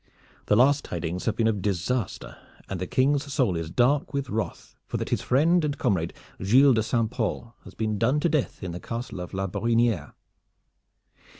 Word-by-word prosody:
The 105 - +4
last 140 +5 +4
tidings 85 +1 -4
have 115 - 0
been 115 - +2
of 105 -3 0
disaster, 100 +4 -2 0.3
and 95 - -4
the 90 - -2
King's 140 +4 +1
soul 130 - +1
is 80 -1 -3
dark 140 - +1
with 140 -2 -2
wrath 110 0 -4
for - - -3
that - - -4
his - - 0
friend 165 +6 +3
and 145 -1 -1
comrade 85 -8 0 0.3
Gilles 130 +7 +6
de 110 - +2
St. 115 0 0
Pol 115 -1 -3
has - - -12
been 110 -2 -2
done 130 +6 +2
to 170 - +3
death 150 - -1
in 90 - -4
the 85 - -6
Castle 115 -2 -5
of 90 - -6
La 95 0 -2
Brohiniere. 110 -3 0
115 Hz, 190 wpm, -26 LUFS, 95-135 Hz, 0.3 s, Gilles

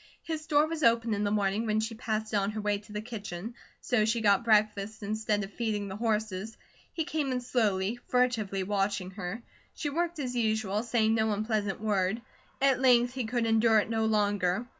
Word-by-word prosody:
His 320 -2 -5
door 295 -1 +4
was 320 0 -4
open 230 -3 +3
in 205 0 -1
the 205 - +1
morning 205 +2 0
when 215 0 +1
she 220 +1 -2
passed 220 -1 -3
it - - +3
on 200 0 +1
her 215 - -4
way 205 -1 0
to 210 0 -16
the 210 0 -4
kitchen, 215 -2 -6 0.3
so 245 -4 +2
she 225 +2 +1
got 205 0 +3
breakfast 215 -1 +1
instead 210 0 -1
of 195 +1 -8
feeding 215 -4 -2
the 190 - -5
horses. 215 -1 -2 0.3
He 325 - -2
came 300 -3 -2
in 250 - 0
slowly, 220 -3 0
furtively 225 -6 +1
watching 195 -1 -1
her. 195 +4 -6 0.3
She 290 - -3
worked 345 +2 -1
as 255 -4 -3
usual, 220 -3 0
saying 225 -2 +1
no 220 -1 +2
unpleasant 210 -2 -1
word. 210 +1 0 0.4
At 270 -2 +3
length 245 -1 +4
he 260 -3 -3
could 235 +1 -1
endure 225 0 +4
it 215 +1 +1
no 225 -1 +1
longer. 205 -1 +1
220 Hz, 200 wpm, -29 LUFS, 205-240 Hz, 0.4 s, door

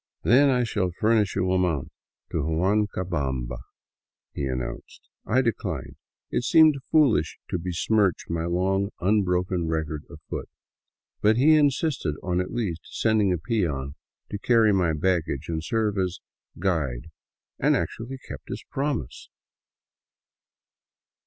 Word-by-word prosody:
" - - -57
Then 135 +5 +5
I 125 -2 +2
shall 105 -5 0
furnish 110 -3 +2
you 95 -1 +1
a 95 - +3
mount 85 -7 -1 0.4
to - - -1
Huancabamba," 80 - -1 0.7
he 70 - -3
announced. 65 -2 -5 0.2
I 130 +4 +3
declined. 115 -3 -3 0.4
It - - 0
seemed 155 +1 +5
foolish 125 - +3
to 90 - 0
besmirch 90 +2 +1
my 85 0 -2
long, 95 +3 +1
unbroken 90 -3 +1
record 80 -2 -2
afoot. - - -7 0.7
But 110 +2 +4
he 150 +5 +6
insisted 140 - +1
on 90 0 0
at 90 - -4
least 100 -9 -2
sending 110 -3 +1
a 90 - +1
peon 75 - -1 0.4
to 100 - -3
carry 115 -2 +4
my 90 -4 +2
baggage 80 -3 0
and 80 -1 -2
to - - -8
serve 110 -4 0
as 90 -1 -1 0.2
" - - -27
guide," 80 -10 -1 0.5
and - - +3
actually 125 +4 -3
kept - - -9
his - - -5
promise 135 - -3
95 Hz, 135 wpm, -25 LUFS, 80-110 Hz, 0.7 s, he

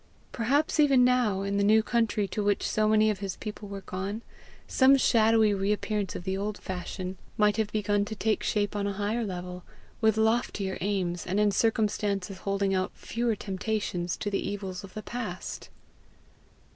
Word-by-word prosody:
Perhaps 280 +7 +1
even 275 -4 +6
now, 240 -6 +2
in 200 0 -1
the 200 - +2
new 215 +2 +5
country 225 -3 +1
to 210 - -2
which 205 -1 +1
so 215 0 +1
many 215 0 +4
of 200 - -4
his 195 -2 -4
people 210 -1 -7
were 200 -1 -6
gone, 195 +4 -5 0.4
some 270 +1 +5
shadowy 225 -4 +4
reappearance 205 0 -1
of - - -5
the 190 +1 -2
old 205 +2 -3
fashion 185 0 -5 0.2
might 210 0 +3
have 215 -2 0
begun 205 -1 +1
to 220 - -6
take 215 +1 0
shape 205 -1 0
on 200 -1 -1
a 200 - -2
higher 210 +4 -1
level, 180 -2 -5 0.4
with 220 -1 +3
loftier 220 -3 0
aims, 185 -3 -1
and 190 +3 0
in 210 -1 +4
circumstances 205 -3 0
holding 195 0 0
out 185 0 0
fewer 235 -1 -1
temptations 195 -3 -2
to 205 - -3
the 195 - 0
evils 195 -1 -4
of 195 - -12
the 215 - -5
past! 225 -7 -5
205 Hz, 175 wpm, -28 LUFS, 195-220 Hz, 0.4 s, even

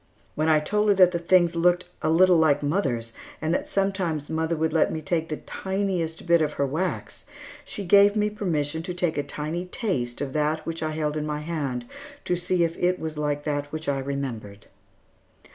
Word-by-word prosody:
When 155 +1 0
I 155 -1 +5
told 210 +7 +1
her 200 - +5
that 185 -2 +6
the 170 - -1
things 170 0 +3
looked 175 +2 +3 0.2
a - - +1
little 180 +2 +5
like 150 -3 +3
mother's 130 - -1 0.3
and 155 +2 -1
that - - -1
sometimes 185 -7 -1
mother 160 +1 0
let 160 0 +2
me 160 - -3
take 160 +1 -1
the 155 - -3
tiniest 190 -5 -3
bit 170 -1 +4
of 155 - 0
her 140 - 0
wax, 160 +7 -3 0.4
she 200 - -7
gave 200 +3 +6
me 210 0 +1
permission 160 -7 -1
to 180 +1 -5
take 175 -2 0
a - - +3
tiny 150 +5 -4
taste 180 - -2
of 135 -1 -4
that 155 +1 0
which 165 0 -4
I 155 - -1
held 155 -1 -1
in 150 - -2
my 150 0 -3
hand 145 -7 -3 0.4
to 180 - +1
see 175 0 +1
if 165 0 -1
it 180 +1 +2
was 155 -1 -5
like 145 -1 -1
that 145 -1 -2
which 155 0 -5
I 140 -1 +1
remembered. 130 -7 -5
160 Hz, 200 wpm, -25 LUFS, 150-180 Hz, 0.4 s, that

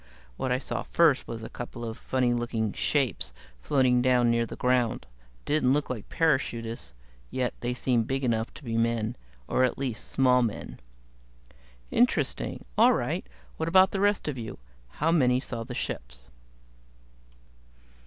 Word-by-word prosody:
What 130 - -2
I 125 - +3
saw 130 - -3
first 160 -5 +3
was 115 -1 -6
a - - -5
couple 120 -1 -7
of 110 -1 -4
funny 125 -1 0
looking 115 -3 -1
shapes 115 - 0 0.3
floating 125 - +3
down 125 -2 +4
near 115 0 +1
the - - -7
ground. 125 -2 +1 0.4
Didn't 145 -4 +2
look 145 -2 0
like 115 -5 -6
parachutists, 120 - 0 0.4
yet 125 -1 -1
they 120 +1 -2
seemed 120 -3 +1
big 135 0 -1
enough 115 -2 0
to - - -12
be 115 -3 -2
men 115 0 0 0.3
or 130 - +2
at 125 - +1
least, 125 -5 -4
small 125 -1 +4
men." 115 -4 -3 1.1
"Interesting. - - +1
All - - +7
right, - - -2 0.3
what 160 - -1
about 185 +2 +6
the 195 - -2
rest 205 -2 +2
of 140 -4 -3
you? 110 -2 -6 0.3
How 155 - 0
many 125 -6 +4
saw 120 -3 -4
the 125 +1 -7
ships?" - - -6
125 Hz, 155 wpm, -28 LUFS, 115-135 Hz, 1.1 s, All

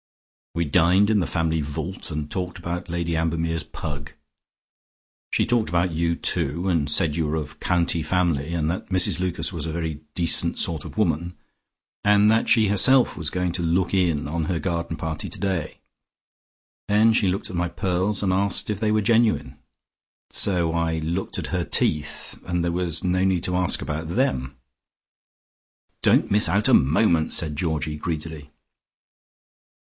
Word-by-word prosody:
We 85 0 0
dined 90 +7 +3
in 105 - +3
the 90 - -1
family 80 -2 0
vault 75 +6 -5
and 75 -2 -4
talked 90 0 -4
about 85 0 -5
Lady 85 0 -2
Ambermere's 80 0 -1
pug. 70 -2 -7 1.2
She - - +2
talked 120 -3 +1
about 90 +1 +1
you, 85 +1 0
too, 85 +3 0
and 80 -6 +1
said 75 -1 +1
you 80 -2 0
were 75 - -1
of 75 -1 -5
county 85 -2 +1
family, 85 -2 0
and 80 -2 0
that 90 - -6
Mrs 95 -2 +2
Lucas 90 -1 -1
was - - -4
a - - -3
very 80 -2 -4
decent 85 -2 +3
sort 80 -3 -2
of - - -10
woman, 85 -3 0 0.7
and 105 +1 +5
that 110 - +1
she 110 -3 +4
herself 125 +6 +4
was 80 -3 0
going 90 +1 -1
to 85 +1 -4
look 85 +2 0
in 85 -7 +1
on 80 +1 -2
her 90 +1 -1
garden 85 -2 -3
party 80 -1 -4
today. 95 -6 -3 1.1
Then 110 +2 +4
she 105 -3 +2
looked 95 +2 -2
at - - -6
my 85 0 -1
pearls, 95 +2 -1
and 95 -2 +1
asked 100 +2 0
if 105 - -3
they 110 -1 +1
were 110 0 +2
genuine. 115 +1 +1 0.7
So 90 -4 +1
I 85 -1 0
looked 85 +4 -2
at - - -3
her - - 0
teeth, 75 -1 -1
and 90 -1 -1
there 85 - 0
was 85 -2 -1
no 90 +1 +1
need 95 -3 +1
to 90 - -1
ask 90 -1 0
about 80 +2 -4
them." 70 - -1 1.4
"Don't - - +3
miss 105 +1 +5
out 100 +2 +2
a - - +3
moment," 80 +3 +3
said 80 -4 +2
Georgie 75 -1 -2
greedily. 80 -2 -5
85 Hz, 170 wpm, -23 LUFS, 80-95 Hz, 1.4 s, and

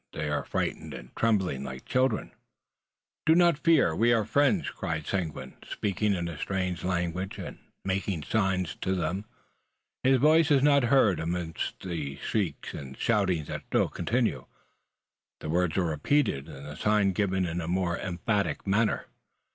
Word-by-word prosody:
They 75 -1 -3
are 75 - 0
frightened, - - -3
and - - -11
tremble 105 -5 +2
like 65 -1 -7
children. 130 +1 +1 1.0
"Do 160 - +7
not 170 -3 +4
fear; 160 - +4
we 115 +6 +3
are 115 -3 +3
friends!" 145 - +2
cried 80 -5 -4
Seguin, 90 -6 -3
speaking 105 0 -1
in 85 -1 -2
a 85 -3 -6
strange 90 -2 -2
language, 90 +1 -2
and - - -7 0.3
making 95 -4 -1
signs 95 -2 0
to 95 - 0
them. 95 +3 -2 0.8
His 130 0 +4
voice 155 +4 +5
is 140 -3 +4
not 140 -3 +5
heard 120 -7 +4
amidst 85 0 -3
the 80 -7 -4
shrieks 95 -2 -2
and 65 -2 -8
shouting 95 -8 +1
that - - -6
still - - +2
continue. 120 0 -1 0.9
The - - -6
words 90 0 +1
are 95 - +3
repeated, 80 - +1
and 70 -2 -9
the 75 - -7
sign 105 -2 +3
given 95 -1 0
in 85 0 -2
a 80 - -5
more 90 -1 0
emphatic 100 +3 -1
manner. 105 +3 +1
95 Hz, 155 wpm, -28 LUFS, 85-115 Hz, 1.0 s, Do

